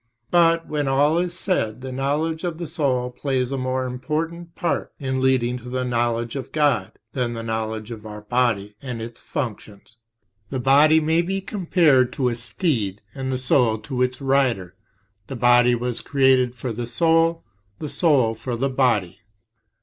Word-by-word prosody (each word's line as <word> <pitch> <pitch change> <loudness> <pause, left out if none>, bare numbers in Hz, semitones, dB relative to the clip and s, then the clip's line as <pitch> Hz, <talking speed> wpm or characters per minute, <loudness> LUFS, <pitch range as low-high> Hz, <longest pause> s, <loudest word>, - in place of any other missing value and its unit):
But, 165 -1 +4
when 150 -2 -1
all 145 +5 +3
is 175 0 -2
said, 120 - -1
the 130 0 -6
knowledge 150 +5 -1
of 170 -3 -3
the 170 - -5
soul 130 -6 -1
plays 130 -1 -2
a - - -1
more 130 0 -1
important 160 +7 -4
part 170 - -2
in 130 -2 -2
leading 125 -2 +1
to 125 +1 -10
the 130 0 -2
knowledge 120 -1 -1
of 135 - -5
God 145 -11 +1 0.2
than 120 -2 -1
the 115 - -5
knowledge 110 0 -3
of 110 -2 -8
our 105 -1 -8
body 105 -3 0
and 125 -4 -5
its 115 +1 -8
functions. 115 -5 -6 0.5
The 130 - -3
body 145 +5 +5
may 160 +2 +2
be 190 +3 -2
compared 165 - +2
to 130 -2 +1
a - - -2
steed 115 - -2
and 130 -1 -4
the 130 - 0
soul 125 -3 +3
to 130 -3 -4
its 125 0 0
rider; 130 -10 +1 0.5
the 135 - -6
body 120 0 +4
was 120 0 -3
created 130 -3 +3
for 125 0 -4
the 120 +1 -4
soul, 165 +4 +2 0.3
the 150 - -5
soul 140 -6 +2
for 120 +2 -5
the 135 +4 0
body. 120 -9 +1
130 Hz, 175 wpm, -23 LUFS, 120-150 Hz, 0.5 s, body